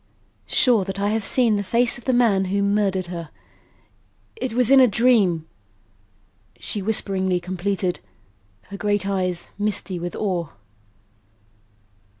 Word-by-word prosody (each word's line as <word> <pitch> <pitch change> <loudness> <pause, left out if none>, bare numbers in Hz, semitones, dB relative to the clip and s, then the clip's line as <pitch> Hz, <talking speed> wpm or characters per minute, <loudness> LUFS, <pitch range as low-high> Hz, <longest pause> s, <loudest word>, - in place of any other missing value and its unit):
"Sure 235 -6 +3
that 195 +1 -6
I 200 +1 0
have 220 0 -1
seen 230 0 +2
the 205 - -2
face 240 +5 +2
of - - -19
the 260 - +2
man 225 -6 +3
who 200 +2 0
murdered 200 -2 0
her. 170 -3 -7 1.1
It 260 - -4
was 250 +1 +2
in 275 - +8
a 255 - +7
dream," 205 -8 +2 1.1
she 205 - -4
whisperingly 190 -3 0
completed, 185 +1 -2 0.7
her 200 - -7
great 205 -1 -1
eyes 185 -3 -2
misty 205 -3 -2
with 175 +1 -5
awe. 180 -6 -2
200 Hz, 135 wpm, -22 LUFS, 185-220 Hz, 1.1 s, in